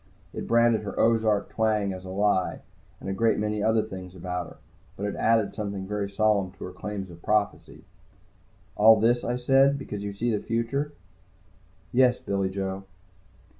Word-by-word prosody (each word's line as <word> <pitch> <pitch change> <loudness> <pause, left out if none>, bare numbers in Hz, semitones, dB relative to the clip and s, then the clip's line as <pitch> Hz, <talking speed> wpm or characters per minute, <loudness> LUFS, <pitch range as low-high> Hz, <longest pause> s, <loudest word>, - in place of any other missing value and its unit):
It - - -5
branded 115 -1 +4
her 105 - -6
Ozark 110 -2 +2
twang 105 -3 0
as 95 0 -9
a - - -7
lie, 95 -1 0 0.4
and - - -9
a 95 - -1
great 115 +3 +2
many 105 0 -1
other 110 +1 +2
things 95 -3 -9
about 90 -1 -4
her. - - -14 0.4
But 100 - -3
it 105 - -3
added 115 -2 +2
something 100 -2 -4
very 105 -1 -2
solid 100 -2 +1
to - - -10
her 90 - -6
claims 95 0 -6
of 85 0 -13
prophecy. 105 +1 -1 0.9
"All 110 +1 +7
this," 120 +2 +2
I 120 - -1
said. 135 +3 +4
"Because 105 -7 -6
you 100 0 -4
see 110 +3 -1
the 105 - -3
future?" 130 +6 -2 1.0
"Yes, 125 0 +4
Billy 100 -1 -1
Joe." 95 0 -4
105 Hz, 170 wpm, -26 LUFS, 95-115 Hz, 1.0 s, All